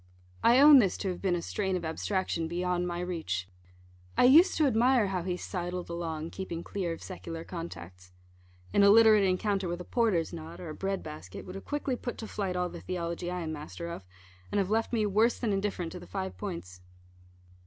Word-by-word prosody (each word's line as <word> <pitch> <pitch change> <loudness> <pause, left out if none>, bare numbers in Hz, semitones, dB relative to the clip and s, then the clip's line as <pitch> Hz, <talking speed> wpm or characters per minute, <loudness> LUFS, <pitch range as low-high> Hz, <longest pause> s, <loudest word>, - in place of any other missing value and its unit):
I 240 +2 +6
own 290 -1 +10
this 195 -6 +2
to 195 - -2
have 180 - -5
been 185 -3 +1
a 170 - -3
strain 190 -2 -1
of 175 -2 -3
abstraction 165 0 -1
beyond 180 +1 -1
my 175 0 -3
reach. 160 - -3 0.7
I - - +5
used 305 +9 +7
to 310 - +4
admire 245 -3 +3
how 185 -2 -1
he 180 +1 -2
sidled 180 -1 -4
along, 165 -1 -4
keeping 170 -3 -5
clear 185 -4 -3
of 165 - -6
secular 165 -3 -7
contacts. 90 - -8 0.6
An - - +4
illiterate 215 +1 +7
encounter 190 +1 0
with 175 0 -3
a - - -5
porter's 210 -10 +1
knot, 160 -1 -8
or 175 - -7
a - - -5
bread 195 +3 -3
basket, 150 -12 -8
would 185 - -8
have 195 - -8
quickly 290 -3 -2
put 245 0 -5
to 220 - -6
flight 195 -4 -3
all 180 0 0
the - - -9
theology 175 -1 -3
I 180 0 -3
am 160 -1 -3
master 155 +3 -7
of, 170 - -7 0.5
and - - 0
have 195 0 +1
left 225 +1 +1
me 225 -3 +1
worse 215 +4 +3
than 225 -4 -1
indifferent 195 -4 -2
to 180 - -7
the - - -12
five 190 -1 -4
points. 135 - -7
180 Hz, 205 wpm, -30 LUFS, 170-205 Hz, 0.7 s, own